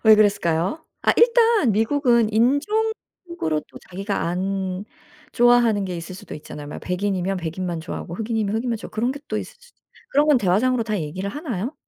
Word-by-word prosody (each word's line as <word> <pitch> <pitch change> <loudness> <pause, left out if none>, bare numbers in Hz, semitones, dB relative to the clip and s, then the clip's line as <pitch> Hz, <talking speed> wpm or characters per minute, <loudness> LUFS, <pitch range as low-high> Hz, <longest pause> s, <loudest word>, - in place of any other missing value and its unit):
왜 220 0 +9
그랬을까요? 200 - +1 0.2
아 - - +4
일단 465 - +5
미국은 235 0 +2
인종으로 335 - 0
또 - - -12
자기가 195 +2 -2
안 190 +1 -2 0.5
좋아하는 240 -4 +4
게 180 -2 -4
있을 170 +2 -7
수도 185 - -9
있잖아요. 150 -1 -9
막 150 - -7
백인이면 190 0 -1
백인만 170 0 -3
좋아하고 170 +2 -6
흑인이면 220 -1 -1
흑인만 235 0 -1
좋아하고 220 - -10
그런 240 +4 0
게 285 - -9
또 - - -2
있을 - - -8
수도 485 0 -23 0.3
그런 290 +2 +3
건 295 -4 +5
대화상으로 230 +6 +2
다 215 -2 -1
얘기를 185 +6 -4
하나요? 250 - -4
215 Hz, 405 characters per minute, -23 LUFS, 185-255 Hz, 0.5 s, 왜